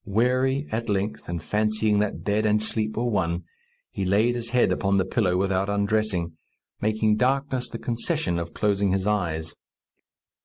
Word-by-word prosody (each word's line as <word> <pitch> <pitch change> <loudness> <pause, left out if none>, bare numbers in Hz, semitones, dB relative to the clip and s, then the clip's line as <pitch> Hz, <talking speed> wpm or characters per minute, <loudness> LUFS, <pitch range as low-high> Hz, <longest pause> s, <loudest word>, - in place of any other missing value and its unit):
Weary, 130 +6 +1
at 115 +1 -2
length, 100 -1 -2
and 85 -2 -4
fancying 105 +2 +1
that 105 -1 -2
bed 105 +1 +1
and 105 0 +3
sleep 110 0 -2
were 120 - 0
one, 90 -7 0 0.5
he 100 - -3
laid 105 +6 +3
his 120 -1 -4
head 125 0 +3
upon 100 0 +1
the 95 - +2
pillow 95 -3 +1
without 95 +1 0
undressing, 100 -5 0 0.5
making 110 0 +2
darkness 130 0 0
the 115 - -5
concession 120 - -1
of 85 0 -5
closing 100 -2 +1
his 95 0 0
eyes. 85 -7 -1
105 Hz, 160 wpm, -25 LUFS, 95-115 Hz, 0.5 s, and